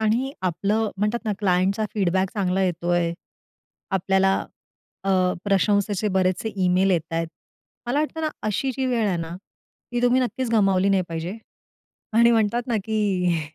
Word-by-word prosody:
आणि 235 +5 +1
आपलं 200 +5 0
म्हणतात 210 +4 0
ना, 215 - 0
क्लायंटचा 195 +2 +1
फीडबॅक 190 -2 +1
चांगला 190 -2 0
येतोय. 175 -1 0 0.8
आपल्याला, 190 0 +2 0.7
अ, - - -2 0.4
प्रशंसेचे 205 +1 +1
बरेचसे 185 +3 0 0.2
ईमेल 185 +2 +3
येतायत. 165 -1 0 0.6
मला 250 +5 0
वाटतं 310 +1 -2
ना, 310 - 0 0.2
अशी 215 +6 0
जी 265 -1 0
वेळ 235 -4 +1
आहे 185 - 0
ना, 165 0 -5 0.6
ती 245 - -1
तुम्ही 245 +1 +4
नक्कीच 250 0 -2
गमावली 195 -4 +3
नाही 195 -1 +3
पाहिजे 165 +4 -4 0.8
आणि 235 +1 +6
म्हणतात 230 +1 +2
ना 235 -3 0
की 190 -6 +1
200 Hz, 140 wpm, -24 LUFS, 185-225 Hz, 0.8 s, आणि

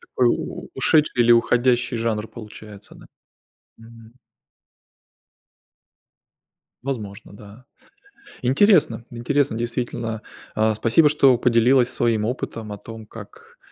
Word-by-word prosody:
такой 125 -2 0
у - - -4
ушедший, 150 -6 +2
или 120 0 +5
уходящий 120 +1 +2
жанр 110 -1 -2
получается, 105 -2 -12
да. - - -16 0.7
Мгм. 115 0 -16 2.7
Возможно, 110 -7 -6
да. 105 +4 -15 0.8
Интересно 135 - +3
интересно 125 +1 -1
действительно. 115 -1 -4 0.3
А, 110 0 +1
спасибо, 120 +8 +3
что 135 -4 +4
поделилась 125 +1 +3
своим 115 -3 0
опытом 115 -2 -5
о 105 - -8
том 110 0 -11
как, 460 - -14
120 Hz, 100 wpm, -22 LUFS, 110-130 Hz, 2.7 s, или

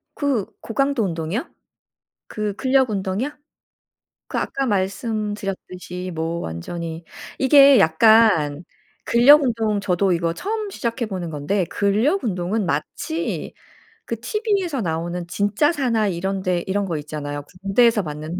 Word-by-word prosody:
그 275 -9 0
고강도 275 0 0
운동이요? 170 - -3 0.8
그 210 -1 -3
근력 260 -1 +2
운동이요? 195 +6 -2 1.0
그 - - -2
아까 275 0 -2
말씀드렸듯이 195 -3 -3
뭐 165 +1 -2
완전히 165 - -6 0.3
이게 275 0 +7
약간 165 -4 +4 0.4
근력 280 +6 +6
운동 225 -5 0
저도 190 0 +1
이거 170 -1 0
처음 425 - -3
시작해 235 -7 -3
보는 185 -5 -5
건데 160 +6 -1
근력 215 - +1
운동은 195 +1 -1
마치 315 - -3 0.5
그 230 - -4
티브이에서 380 - -1
나오는 170 0 -3
진짜 205 - +1
사나이 230 - 0
이런 190 +2 -2
데 180 -2 0
이런 200 +1 0
거 170 -4 -2
있잖아요. 145 -1 -5 0.2
군대에서 215 +3 +3
받는 155 +2 -5
200 Hz, 280 characters per minute, -22 LUFS, 175-240 Hz, 1.0 s, 이게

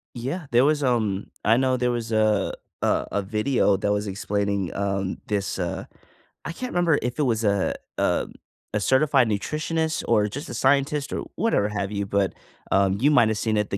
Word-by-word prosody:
Yeah, 135 +8 -4
there 120 +1 +5
was, 150 0 +2
um, 110 -6 0 0.2
I 115 +2 +4
know 130 -1 +2
there 125 0 +1
was 115 -1 -3
a 110 -2 +2 0.3
a - - +1
a 100 - 0
video 105 0 +1
that 100 +1 0
was 105 0 0
explaining, 100 -1 -1
um, 100 -1 -1
this, 100 -2 -1
uh 90 -2 -3 0.6
I 165 - -3
can't 250 +9 -5
remember 175 -4 +2
if 125 0 -3
it - - +3
was 115 -3 0
a, 100 -2 +1 0.2
um, - - 0 0.4
a 105 - +1
certified 130 +3 +3
nutritionist 155 +9 -1
or 105 -3 +3
just 140 +8 -6
a - - -5
scientist 140 +3 +1
or - - -3
whatever 225 - +1
have 100 -1 -3
you, 100 -1 -2
but, 100 -1 0 0.4
um, 95 0 +3
you 145 +4 +4
might 120 -7 +5
have 110 - -1
seen 110 -1 0
it, 105 - 0
the 100 - -1
110 Hz, 195 wpm, -24 LUFS, 100-135 Hz, 0.6 s, there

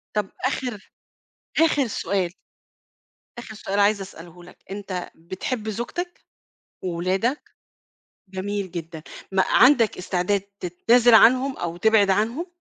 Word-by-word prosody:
طَب 210 -2 0 0.2
آخِر 250 -6 -4 0.8
آخِر 290 -5 +1
سؤال. 195 -4 -1 1.1
آخِر 240 -2 -8
سؤال 200 -1 -3
عايزة 200 0 +3
أسأله 175 -2 -11
لك، 180 - -15
أنت 195 -3 -5
بتحب 200 +7 -5
زوجتك 350 - -5 0.6
وأولادك؟ 185 - -1 0.8
جميل 195 0 -4
جدًا، 165 -2 -7 0.3
ما 190 0 +3
عندك 245 -4 +5
استعداد 185 +2 0 0.2
تتنازِل 230 +7 +4
عنهم 255 +4 +5
أو 170 -1 -4
تبعد 210 0 +4
عنهم؟ 230 - 0
205 Hz, 110 wpm, -23 LUFS, 185-235 Hz, 1.1 s, عندك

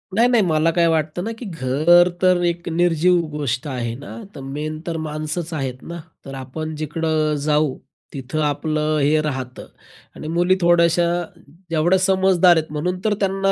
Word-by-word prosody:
नाही, 235 +2 +4
नाही. 235 -4 +4
मला 160 0 +2
काय 170 0 +2
वाटतं 160 +2 -1
ना, 225 - -3
की 245 - -7
घर 165 +2 +3
तर 180 -1 +3
एक 170 0 -2
निर्जीव 175 +1 +2 0.2
गोष्ट 135 -1 -2
आहे 120 -4 -3
ना. 140 - -10 0.2
तर - - -8
मेन 150 +3 -5
तर 165 -1 -2
माणसंच 155 +3 -4
आहेत 130 -4 -4
ना? 170 0 -7 0.3
तर 135 - -8
आपण 155 +4 -6
जिकडं 155 0 -1
जाऊ, 150 -2 +1 0.4
तिथं 135 +3 -4
आपलं 155 +1 0
हे 150 +2 +3
राहतं 130 -4 -5 0.5
आणि 155 - -8
मुली 175 +3 +2
थोड्याशा, 170 0 +4 0.6
जेवढ्या 165 +3 +2
समजदार 190 -2 +4
आहेत, 155 -1 -2
म्हणून 180 +5 -2
तर 215 - +3
त्यांना 195 0 +1
160 Hz, 165 wpm, -21 LUFS, 150-175 Hz, 0.6 s, नाही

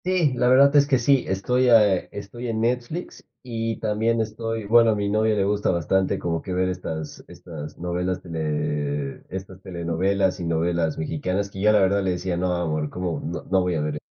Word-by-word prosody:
Sí, 180 -7 +2
la 125 0 +1
verdad 140 +3 +6
es 140 -1 +6
que 135 -2 +3
sí, 130 +2 +2
estoy, 125 +7 +1
eh, 105 -5 +4
estoy 105 +5 -7
en 110 -1 -2
Netflix 125 +8 -3 0.2
y 115 -2 -3
también 110 +2 +1
estoy 115 0 -3
bueno, 115 +2 +5
a - - +1
mi 100 -1 -1
novia 110 +1 +2
le 100 - +1
gusta 105 +1 0
bastante 95 +2 +1
como 85 -1 -2
que 95 - -5
ver 90 0 +1
estas 80 -4 -5
estas 85 -4 -9
novelas 90 +1 -2
tele 75 -4 -3
estas 95 0 -8
telenovelas 95 +2 -1
y 85 - -4
novelas 85 -1 0
mexicanas, 90 +6 -2
que 95 - -7
yo 105 +1 +5
la 105 - +5
verdad 100 +1 +3
le 95 - +1
decía: 90 0 -2
"No, 90 +1 0
amor, 75 -3 -1
como 90 0 -3
no 85 +3 -5
no 95 0 +1
voy 90 -1 0
a 80 - 0
ver 75 0 -2
e - - -7
95 Hz, 205 wpm, -24 LUFS, 85-115 Hz, 0.2 s, verdad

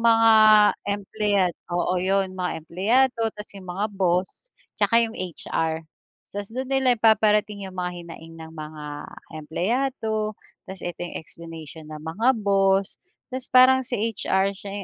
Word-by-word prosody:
mga 225 -1 +5 0.6
empleyad 200 -2 0 0.2
oo, 175 +1 0
'yon, 190 0 +1
mga 180 -1 -2
empleyado 230 +9 +2 0.2
'tas 210 - -9
yung 190 -2 -11
mga 190 +4 -2
boss, 185 - -1 0.3
'tsaka 205 +3 +4
'yong 225 - -4
HR. 165 -4 -3 0.5
'Tas 200 0 -5
do'n 255 +3 -4
nila 260 -2 +3
ipaparating 210 -2 +2
'yong 185 - -12
mga 180 0 -2
hinaing 165 -1 -11
ng 160 0 -10
mga 155 -1 -8 0.5
empleyado. 215 - -1 0.3
'Tas 190 0 -9
ito 175 0 -5
'yong 175 - -5
explanation 160 -1 -10
ng 155 0 -9
mga 205 +11 +1
boss. 195 -1 +2 0.3
'Tas 255 -1 -5
parang 260 +1 +6
si 250 - -6
HR 195 -3 0
siya 200 +1 -8
195 Hz, 140 wpm, -24 LUFS, 175-225 Hz, 0.6 s, parang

